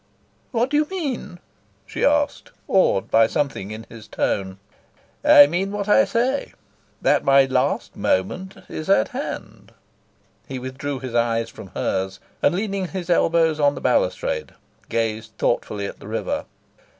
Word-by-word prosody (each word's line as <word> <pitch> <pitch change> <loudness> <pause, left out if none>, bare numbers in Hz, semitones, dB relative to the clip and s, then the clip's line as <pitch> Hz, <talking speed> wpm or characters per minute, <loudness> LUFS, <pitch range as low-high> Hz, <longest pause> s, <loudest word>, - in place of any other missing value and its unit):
"What 245 +1 0
do 295 - +3
you 300 0 +2
mean?" 280 - -4 0.5
she - - -4
asked, 290 0 +1 0.2
awed 185 - +2
by 115 0 +5
something 135 -8 -2
in 110 +1 -7
his 115 -2 -12
tone. 95 -1 -2 0.7
"I 145 - +9
mean 180 +6 -1
what 205 0 -3
I 240 +6 +5
say: 255 +4 -1 0.5
that - - +3
my 135 0 +6
last 130 - 0
moment 180 - -1
is 155 +3 -6
at 110 - +4
hand." - - -7 0.7
He 135 - -5
withdrew 130 +2 -4
his 130 -3 -6
eyes 115 -1 +1
from - - -10
hers, 95 +1 -2 0.2
and, 180 - +3
leaning 195 -1 -2
his 180 -1 -4
elbows 165 -2 +3
on 145 -1 +3
the - - -5
balustrade, - - 0 0.3
gazed 110 -1 -2
thoughtfully 105 -3 -1
at - - -7
the - - -11
river. - - -2
150 Hz, 150 wpm, -22 LUFS, -, 0.7 s, I